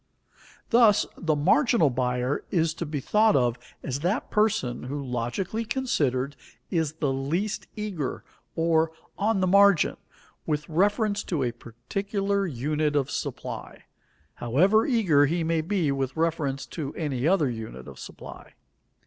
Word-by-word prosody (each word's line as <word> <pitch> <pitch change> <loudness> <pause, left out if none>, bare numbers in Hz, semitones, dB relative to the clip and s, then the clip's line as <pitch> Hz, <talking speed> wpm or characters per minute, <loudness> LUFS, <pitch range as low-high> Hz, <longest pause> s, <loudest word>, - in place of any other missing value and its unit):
Thus, 230 -3 +5
the 160 -3 0
marginal 185 - +3
buyer 125 +2 -1
is 165 -3 +1
to 165 0 -5
be 145 -1 -3
thought 215 +9 +3
of 125 -2 +2 0.2
as 135 0 -3
that 180 - -1
person 210 - +1
who, 140 +3 -4
logically 125 - -2
considered, 145 - -1 0.4
is 160 -5 0
the 145 -4 -1
least 170 +11 -2
eager, 195 -10 -4 0.3
or 165 -1 +2 0.2
on 205 -1 +1
the - - +3
margin, 200 -2 +5 0.5
with 150 -1 -1
reference 205 +5 +1
to 155 -7 -1
a 120 - 0
particular 195 - -3
unit 150 +2 -1
of 140 -2 +1
supply, - - -5 0.5
however 185 - +3
eager 180 - +4
he 165 +3 0
may 165 0 +1
be 170 -3 0
with 135 +1 -2
reference 150 -4 -1
to 145 +1 -6
any 145 -4 -1
other 170 -5 +3
unit 110 - -6
of - - -11
supply. - - -11
160 Hz, 140 wpm, -26 LUFS, 135-200 Hz, 0.5 s, Thus